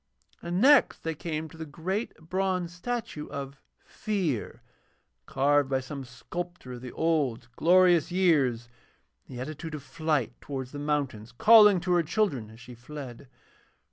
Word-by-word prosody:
And 175 +1 -2
next 275 +4 +5
they 165 - -2
came 160 0 -4
to 160 - -14
the 160 - -5
great 185 +9 -3
bronze 180 +1 -2
statue 200 -5 -4
of 140 0 -7 0.3
Fear, 180 - -3 0.6
carved 145 0 +2
by 135 -1 +1
some 135 +1 -7
sculptor 170 +3 -7
of 120 - -8
the 125 -1 -7
old 140 -8 0
glorious 175 -1 +4
years 145 -11 +2 0.6
in 130 - -10
the 120 - -5
attitude 155 +2 -6
of 145 - -8
flight 155 -4 -1
towards 130 -3 -6
the 145 - -7
mountains, 140 -7 -2
calling 210 - +7
to 180 +1 -2
her 175 -1 +4
children 155 - -1
as 110 +1 -14
she 125 0 -11
fled. 130 +1 -9
150 Hz, 150 wpm, -28 LUFS, 130-175 Hz, 0.6 s, calling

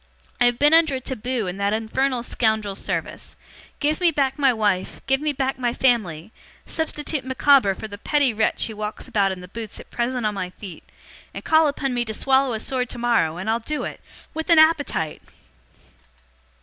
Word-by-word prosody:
I - - +6
have 245 -1 +3
been 295 +4 +4
under 320 -4 +5
a - - -2
Taboo 250 -2 -3
in 180 +1 -4
that 200 +1 0
infernal 240 +3 -1
scoundrel's 220 -4 -1
service. - - -4 0.4
Give 305 +3 0
me 350 - +5
back 280 -2 0
my 275 -2 +5
wife, 205 -5 -1
give 270 +1 +1
me 305 0 0
back 265 -1 -2
my 245 -1 -1
family, 215 -9 0 0.3
substitute 300 -3 -2
Micawber 260 -5 +4
for 220 - -7
the 205 -1 -10
petty 285 -1 +2
wretch 220 +1 +1
who 220 - -6
walks 210 0 -5
about 200 -2 +1
in 185 -1 -6
the 180 - -10
boots 220 +2 -6
at - - -13
present 245 0 -1
on 210 - 0
my 185 -2 -4
feet, 185 -2 -11 0.5
and - - -6
call 315 0 +5
upon 275 -2 -2
me 240 -1 0
to 220 -1 -4
swallow 265 0 +2
a 220 - -2
sword 250 +1 -2
tomorrow, 235 -9 +1
and 190 +4 -6
I'll 225 +1 +1
do 300 +6 -3
it. - - -6 0.3
With 320 +1 -5
an 335 - +6
appetite! 305 - +3
245 Hz, 195 wpm, -23 LUFS, 210-275 Hz, 0.5 s, I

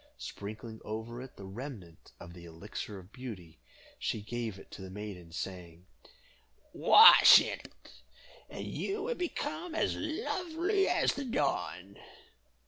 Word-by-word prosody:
Sprinkling 110 +2 -8
over 110 +3 -6
it 130 - -11
the 100 - -9
remnant 95 - -9
of 85 0 -11
the 85 -1 -12
Elixir 100 +5 -7
of 95 +1 -13
Beauty, 100 - -9 0.4
she 105 - -2
gave 115 -2 -4
it - - -15
to - - -10
the 95 - -8
maiden, 95 -4 -8
saying, 90 -1 -7 0.9
"Wash 450 +2 +9
in - - -3
it, - - -16 0.6
and - - -7
you 400 +1 -3
will 485 +2 -1
become 355 -3 -4
as - - 0
lovely 365 +1 -1
as - - +2
the 285 - -5
dawn." 100 - -2
105 Hz, 135 wpm, -31 LUFS, 90-150 Hz, 0.9 s, Wash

